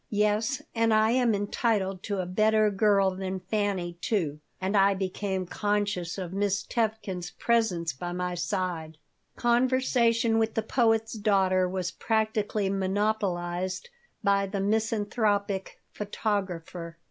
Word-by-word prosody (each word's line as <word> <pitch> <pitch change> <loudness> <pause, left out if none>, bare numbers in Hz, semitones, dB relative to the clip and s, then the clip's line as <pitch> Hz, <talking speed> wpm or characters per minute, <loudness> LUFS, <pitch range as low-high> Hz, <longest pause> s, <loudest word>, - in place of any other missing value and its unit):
"Yes, 210 +4 +1
and 230 -1 +2
I 215 +1 +4
am 245 -3 +3
entitled 200 -2 0
to 200 -3 -1
a - - -4
better 215 +3 +3
girl 195 -1 +3
than 190 0 -4
Fanny, 185 -3 -2
too." 160 -9 -1 0.2
And 190 +2 -1
I 195 0 +5
became 190 0 -2
conscious 205 -3 -1
of 185 -2 -5
Miss 200 0 0
Tevkin's 215 -6 -2
presence 200 - 0
by 175 +6 -5
my 180 0 -2
side 175 -3 -3 0.4
Conversation 240 -2 +2
with 225 0 0
the 225 - 0
poet's 225 -1 +2
daughter 190 -4 +2
was 185 -1 -2
practically 215 -2 0
monopolized 190 - -1 0.3
by 200 0 +3
the 200 +1 -3
misanthropic 205 -1 0
photographer. 185 -5 -3
200 Hz, 125 wpm, -28 LUFS, 185-220 Hz, 0.4 s, I